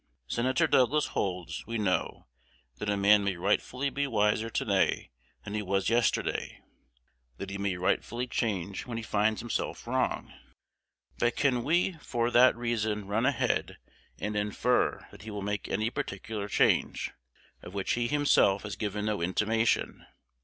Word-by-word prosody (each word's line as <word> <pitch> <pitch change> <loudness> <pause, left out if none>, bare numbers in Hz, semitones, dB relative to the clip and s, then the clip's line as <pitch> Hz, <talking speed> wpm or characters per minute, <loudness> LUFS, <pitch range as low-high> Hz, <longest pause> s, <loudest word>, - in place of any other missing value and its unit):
Senator 130 - +1
Douglas 145 +1 +3
holds, 90 -3 -3
we 115 0 -2
know, 95 -4 -1 0.5
that 105 - -2
a 100 - +1
man 100 +1 +5
may 100 -2 0
rightfully 125 +9 0
be 140 0 -1
wiser 110 -1 +1
to - - -2
day 100 - +1 0.3
than 100 - -7
he 105 - -1
was 95 0 0
yesterday; 120 0 0 0.8
that 100 0 -6
he 100 - -5
may 100 -2 0
rightfully 120 +6 0
change 100 -6 -2
when 120 -2 -4
he 115 - -4
finds 110 0 +1
himself 120 -1 -3
wrong. - - -1 0.9
But 120 0 +2
can 125 -4 +1
we 170 +3 +1
for 120 0 -1
that 125 +2 +6
reason 110 -3 -1
run 110 +5 +1
ahead, 140 - 0 0.4
and 105 0 -3
infer 105 +4 0
that - - -13
he 110 - -8
will 105 -2 -5
make 105 +1 -3
any 110 +3 -1
particular 100 0 -4
change, - - +2 0.5
of 90 - -10
which 100 - -1
he 120 0 0
himself 140 -8 +3
has 105 -1 -5
given 105 0 -3
no 105 -4 -1
intimation? 110 +6 0
105 Hz, 155 wpm, -29 LUFS, 100-120 Hz, 0.9 s, that